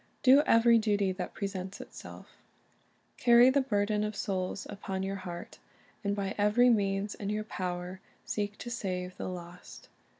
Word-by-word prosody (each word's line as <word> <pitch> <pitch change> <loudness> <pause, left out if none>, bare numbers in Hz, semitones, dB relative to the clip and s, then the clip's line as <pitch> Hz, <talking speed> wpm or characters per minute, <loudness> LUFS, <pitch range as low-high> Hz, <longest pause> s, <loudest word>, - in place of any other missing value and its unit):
Do 270 +2 +7
every 230 0 +6
duty 205 -3 +1
that 185 -1 -6
presents 195 -1 -5
itself - - -12 0.8
Carry 240 +1 +6
the 280 +1 +3
burden 210 -4 0
of 210 0 -3
souls 190 0 -3
upon 195 -1 -5
your 195 +1 -3
heart, 175 -2 -8 0.4
and" 200 0 0
by 200 -1 -2
every 230 +4 +5
means 200 -1 0
in 200 - -5
your 210 +1 -1
power 180 -2 -5 0.2
seek 205 -1 -3
to 240 - -7
save 185 -5 -3
the - - -4
lost. 175 -1 -10
200 Hz, 155 wpm, -30 LUFS, 185-215 Hz, 0.8 s, Do